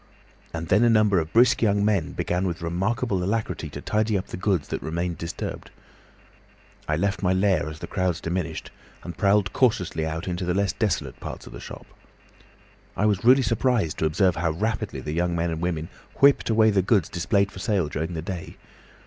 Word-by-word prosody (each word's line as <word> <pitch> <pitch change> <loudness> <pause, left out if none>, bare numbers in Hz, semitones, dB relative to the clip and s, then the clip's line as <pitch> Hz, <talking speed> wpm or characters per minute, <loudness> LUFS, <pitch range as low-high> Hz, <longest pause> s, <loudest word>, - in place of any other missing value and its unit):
And 80 0 -5
then 105 +5 +4
a 120 - +5
number 105 -4 +4
of 80 -1 -4
brisk 120 +2 +4
young 100 -2 +2
men 95 -6 +1
began 90 +2 -1
with 85 -1 -4
remarkable 95 +3 -1
alacrity 95 -5 -2
to 75 0 -8
tidy 110 +2 +1
up 95 - -3
the - - -5
goods 90 -4 0
that - - -3
remained 85 +1 -3
disturbed. 85 0 -5 1.2
I 75 - +1
left 100 +4 -1
my 95 -1 +2
lair 95 -4 +2
as 80 - -8
the - - -6
crowds 90 -3 -1
diminished, 85 -2 -4 0.3
and 85 - -7
prowled 100 -1 +2
cautiously 90 -10 +1
out 80 +3 -4
into 90 0 -2
the 90 0 0
less 100 0 +1
desolate 105 -5 -2
parts - - -7
of - - -11
the - - -8
shop. - - -9 1.1
I 105 - +2
was 105 -2 +1
really 130 +3 +6
surprised 115 - +1
to - - +1
observe 90 +3 +2
how 80 +1 +1
rapidly 105 +7 -2
the 75 - -4
young 85 +1 0
men 85 0 0
and 80 0 -4
women 85 -2 -2 0.3
whipped 140 -3 +4
away 110 -1 +4
the 100 -2 +3
goods 95 -2 +2
displayed 100 +3 0
for - - -10
sale 95 -4 0
during 80 +4 -4
the 80 - -4
day. 90 -2 -6
90 Hz, 200 wpm, -25 LUFS, 85-105 Hz, 1.2 s, really